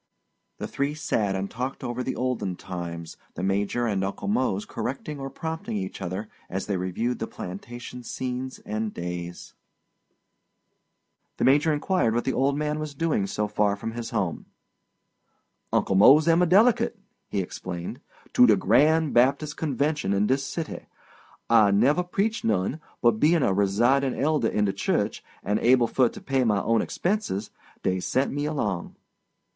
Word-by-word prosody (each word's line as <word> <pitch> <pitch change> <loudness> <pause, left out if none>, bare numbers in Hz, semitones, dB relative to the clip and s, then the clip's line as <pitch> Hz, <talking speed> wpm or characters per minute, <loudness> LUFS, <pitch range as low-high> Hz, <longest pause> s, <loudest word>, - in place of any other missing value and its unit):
The - - -4
three 140 +2 -2
sat 110 -10 0
and 95 +1 -2
talked 125 +6 -5
over 120 0 -3
the 130 - -3
olden 125 -8 -2
times, 85 -3 -7 0.2
the - - -4
Major 100 +5 0
and 100 -4 0
Uncle 100 0 -4
Mose 105 -2 0
correcting 140 +2 -5
or 135 0 -4
prompting 160 -5 -4
each 95 0 -5
other 95 +4 -4 0.2
as 95 +1 -3
they 100 - -1
reviewed 95 +7 -2
the 115 - -3
plantation 120 +7 -8
scenes 130 +1 -4
and 110 0 -2
days. 85 0 -6 1.8
The - - -1
Major 145 +4 +4
inquired 150 - +1
what 120 - +1
the 130 - -1
old 140 +2 +1
man 150 0 -1
was 155 -2 -5
doing 150 -10 0
so 105 +1 -1
far 105 -1 +1
from 110 +2 -5
his 115 0 -5
home. 95 -7 -2 1.2
"Uncle - - +1
Mose 135 - +7
am 165 +1 +5
a 180 - +4
delicate," 230 +5 +4 0.3
he 100 - -2
explained, 90 -1 -5 0.3
"to 125 - +7
de 110 - +6
grand 155 +9 +3
Baptis' 135 +5 +3
convention 150 -5 0
in 100 +1 +2
dis 135 +4 +1
city. 160 +3 -5 0.6
I 110 -3 +6
never 125 - +3
preached 200 +5 -1
none, 110 - 0 0.2
but 120 -2 +4
bein' 155 +2 +4
a 95 - +2
residin' 120 +8 +2
elder 145 -4 +2
in 105 -1 +1
de 100 - 0
church, 100 - -1 0.2
and 105 +3 0
able 125 0 +4
fur 125 +1 +2
to - - -11
pay 135 -1 +1
my 105 -4 +2
own 115 0 +2
expenses, 175 - -2 0.3
dey 95 0 +1
sent 130 +8 0
me 145 +1 -2
along." 105 - -2
120 Hz, 160 wpm, -26 LUFS, 100-145 Hz, 1.8 s, Mose